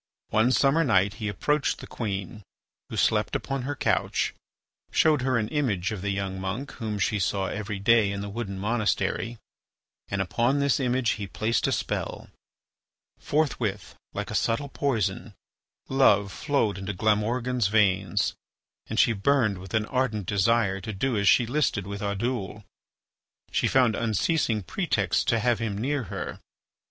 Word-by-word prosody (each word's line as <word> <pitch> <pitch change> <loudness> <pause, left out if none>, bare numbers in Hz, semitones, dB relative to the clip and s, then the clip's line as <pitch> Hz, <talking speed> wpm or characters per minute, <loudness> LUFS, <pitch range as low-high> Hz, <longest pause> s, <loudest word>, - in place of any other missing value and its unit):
One 110 +3 +3
summer 135 +7 +3
night 100 - +3
he 105 - -1
approached 140 +8 0
the - - -9
queen, 100 -2 -4 0.5
who - - -6
slept - - +2
upon 135 -1 -2
her 145 +3 -3
couch, - - 0 0.6
showed 155 -4 +3
her 130 -1 +1
an 105 -2 0
image 115 - 0
of 105 -4 -4
the 100 - -2
young 95 -1 -3
monk 105 +9 -4
whom 110 -3 -4
she 105 +1 0
saw 95 +2 0
every 105 +1 -4
day 105 0 +4
in 100 0 -4
the 100 - -4
wooden 100 -2 -5
monastery, 115 +2 -1 0.7
and 100 - -3
upon 120 +8 +1
this 140 -1 +2
image 125 -2 +1
he 100 -2 -4
placed 110 +5 0
a - - 0
spell. - - -3 0.9
Forthwith, 150 -2 -1 0.2
like - - -4
a - - -4
subtle 140 +5 0
poison, 110 -6 -1 0.5
love 105 -7 +4
flowed 115 - 0
into 95 +2 -4
Glamorgan's 110 +4 +1
veins, 100 -3 +2 0.5
and - - -4
she 115 - +5
burned 110 -2 +2
with 95 +2 -6
an 110 -1 +2
ardent 115 -5 -1
desire 100 0 +2
to 110 +3 -5
do 125 +6 -1
as 100 -1 +1
she 120 - +5
listed 125 -6 0
with 100 0 -6
Oddoul. 105 0 -2 0.9
She - - +1
found 125 -5 +3
unceasing 115 - 0
pretexts - - 0
to 115 - +2
have 120 0 +1
him 110 -3 -2
near 135 +3 -1
her. - - -5
110 Hz, 155 wpm, -26 LUFS, 100-125 Hz, 0.9 s, she